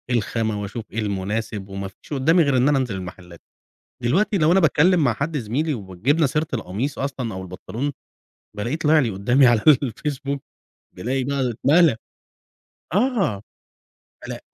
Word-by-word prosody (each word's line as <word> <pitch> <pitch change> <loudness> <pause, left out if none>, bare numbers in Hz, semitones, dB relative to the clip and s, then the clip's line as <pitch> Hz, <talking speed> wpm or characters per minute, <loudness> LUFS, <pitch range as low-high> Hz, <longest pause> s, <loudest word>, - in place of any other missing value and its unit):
الخامة 110 -1 -1
وأشوف 105 +2 -6
إيه 115 - -3
المناسب، 105 0 -3
وما 95 0 -5
فيش 95 +9 -12
قدامي 160 +6 +4
غير 140 -3 +2
إن 130 +3 +4
أنا 145 - +3
أنزل 125 -6 -1
المحلات. 90 -2 -9 0.6
دلوقتي 190 - +2
لو 160 0 +4
أنا 190 - +5
باتكلم 165 +1 +4
مع 120 -5 +2
حد 150 +4 -2
زميلي 140 +7 -1
وجبنا 115 - 0
سيرة 150 +3 -1
القميص 115 +6 -3
أصلًا 130 -5 -3
أو 95 - -5
البنطلون، 110 +9 -5 0.6
بالاقيه 120 +8 -2
طلع 155 0 +4
لي 125 -6 +2
قدامي 120 +7 +3
على 120 -3 +4
الFacebook، 140 +1 +1 0.6
بالاقي 130 +3 -2
بقى 135 -1 -1
اتملى. 145 +5 +4 1.0
آه، 200 - +1 0.9
بلا - - -5
130 Hz, 150 wpm, -22 LUFS, 105-150 Hz, 1.0 s, أنا